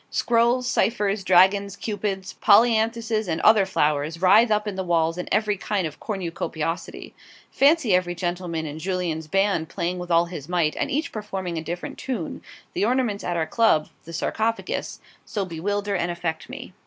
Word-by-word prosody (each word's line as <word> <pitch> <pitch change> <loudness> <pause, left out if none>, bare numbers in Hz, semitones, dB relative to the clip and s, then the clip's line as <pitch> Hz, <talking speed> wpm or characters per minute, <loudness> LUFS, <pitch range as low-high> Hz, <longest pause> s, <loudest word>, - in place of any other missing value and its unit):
Scrolls, 240 +2 +2
ciphers, 210 -4 0
dragons, 190 +2 +4
Cupids, 195 -3 -4
polyanthuses, 225 0 +3
and 165 -1 -1
other 215 -3 +5
flowers 150 -2 0
writhe 205 +6 +5
up 210 0 +1
the 190 -2 -3
walls 165 -2 +1
in 180 - -5
every 210 0 +1
kind 195 -1 -1
of 155 -2 -6
cornucopiosity. 170 -4 -4 0.4
Fancy 280 - +3
every 180 -1 +1
gentleman 175 -2 -3
in 150 +1 -6
Jullien's 170 -3 -2
band 195 -2 +1
playing 180 +1 -3
with 180 0 -7
all 170 0 +4
his 170 -3 -8
might, 170 -4 +1
and - - -2
each 300 +4 -1
performing 190 -5 -4
a - - -7
different 175 +2 -6
tune; 235 -12 -4 0.3
the - - -1
ornaments 235 -3 0
at 175 -1 -2
our 160 - 0
Club, 160 -4 +2 0.2
the 165 - -9
'Sarcophagus,' 220 +7 -2 0.2
so 205 -3 -3
bewilder 200 +4 -2
and 175 -1 -1
affect 170 -2 -4
me. - - -9
190 Hz, 165 wpm, -24 LUFS, 170-215 Hz, 0.4 s, other